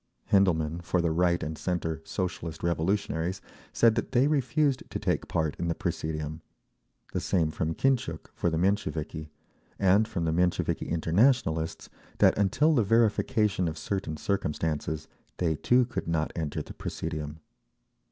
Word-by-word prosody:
Hendelmann, 85 -4 +3
for 85 +1 0
the 85 -1 +1
right 85 +1 +2
and 80 +1 -3
centre 80 -2 -2
Socialist 85 -3 -4
Revolutionaries, 85 +1 0 0.3
said 115 -1 +4
that 115 +3 -3
they 125 +1 +5
refused 145 -1 +1
to - - -3
take - - -1
part 80 -3 -1
in 85 - -1
the 85 - 0
presidium; 80 0 -3 0.7
the - - 0
same 80 -5 +1
from 80 +1 -2
Kintchuk, 125 -12 0
for 85 - 0
the 80 - -1
Mensheviki; 80 -4 -1 0.5
and 100 +3 +4
from 85 -6 -2
the 80 - +1
Mensheviki 90 +2 0
Internationalists, 85 - +1 0.3
that - - +5
until 145 +11 +3
the 130 - +4
verification 105 -2 +2
of 80 0 -4
certain 80 -1 -3
circumstances, 80 -4 -2 0.3
they 80 -3 +1
too 125 +10 +3
could 120 - -5
not 80 -2 0
enter 80 -4 -3
the - - -10
presidium. 75 0 -5
85 Hz, 145 wpm, -28 LUFS, 80-105 Hz, 0.7 s, they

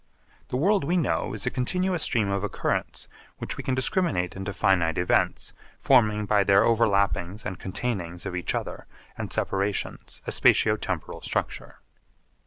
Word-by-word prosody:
The 125 - -2
world 195 +6 +2
we 170 +6 +1
know 160 -7 0
is 105 -2 -2
a - - 0
continuous 180 +7 -1
stream 110 -9 +2
of 100 0 -1
occurrence 105 - -2 0.3
which - - -5
we - - -6
can 130 - 0
discriminate 130 - 0
into 95 +1 -4
finite 90 -4 +1
events 90 - +1 0.3
forming 105 -5 +3
by 105 -1 +3
their 100 0 +5
overlappings 100 -3 +1
and 95 -4 -5
containings 95 -4 -4
of 90 - -4
each 90 - -2
other - - -5 0.3
and - - -6
separations 100 +1 -2
a - - -3
spatio 105 -1 +4
temporal 95 -6 -5
structure. - - -4
105 Hz, 155 wpm, -26 LUFS, 95-125 Hz, 0.3 s, their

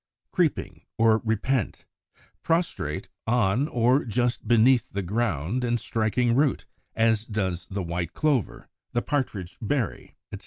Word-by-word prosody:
Creeping - - 0 0.2
or 110 -1 +4
Repent, 110 +1 -1 0.6
prostrate 165 - -1 0.2
on 120 +3 +2
or 125 +1 +2
just 120 0 -1
beneath 120 +2 +4
the 100 0 -3
ground, 100 - -1
and 120 -1 +1
striking 115 +2 +1
root, 140 +1 +2 0.3
as 110 -1 +3
does 95 -6 -3
the 100 -1 -3
White 85 0 -3
Clover, 145 -7 0 0.3
the 120 - 0
Partridge 110 -11 -3
berry, 120 0 -2 0.2
etc. - - -6
115 Hz, 125 wpm, -26 LUFS, 100-125 Hz, 0.6 s, or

